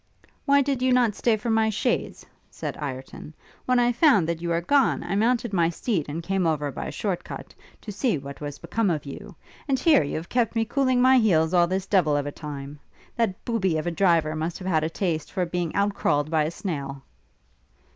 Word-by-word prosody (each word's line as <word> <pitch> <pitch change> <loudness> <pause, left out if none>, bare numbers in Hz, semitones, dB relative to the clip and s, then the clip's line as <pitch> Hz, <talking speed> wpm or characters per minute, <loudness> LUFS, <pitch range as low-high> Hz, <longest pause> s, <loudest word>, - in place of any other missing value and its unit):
'Why 280 0 +4
did 270 -2 -1
not 250 -2 +3
you - - -6
stay 225 +2 +1
for 225 +2 -2
my 220 0 +3
chaise?' 215 - -2 0.2
said - - -6
Ireton. 135 +2 -7 0.3
'When 255 0 +3
I 245 0 +3
found 235 - +4
that 170 -1 -2
you 170 - -3
were 170 0 +1
gone, 270 +10 +2
I 175 - -4
mounted 235 +2 +1
my 170 -3 +3
steed, 170 - -2
and 165 +3 -4
came 190 -1 0
over 150 -3 -1
by - - -5
a - - -5
short 195 -5 -3
cut, - - -9 0.3
to 215 - -7
see 210 - 0
what 140 +1 -9
was 145 -1 -5
become 225 -3 -1
of 155 -4 -2
you; 140 - -9 0.3
and 270 -2 +2
here 305 - +4
you 145 - -3
have 160 +2 -5
kept 240 -2 0
me 225 0 +1
cooling 255 0 +1
my 260 0 +6
heels 165 -7 +2
all 175 -1 +4
this 190 +1 -2
devil 175 -7 +2
of 145 - -2
a 145 - -3
time. 145 -1 -8 0.4
That 225 -6 -1
booby 190 -8 0
of 155 - -3
a 175 - -1
driver 165 -3 +2
must 160 +2 -3
have 185 - -7
had 160 -4 +2
a 160 - 0
taste 165 -3 -2
for 185 -2 -1
being 175 -1 -3
out 200 0 +1
crawled 145 -4 0
by 155 -2 +2
a - - -1
snail.' 140 -6 -5
180 Hz, 225 wpm, -25 LUFS, 155-230 Hz, 0.4 s, my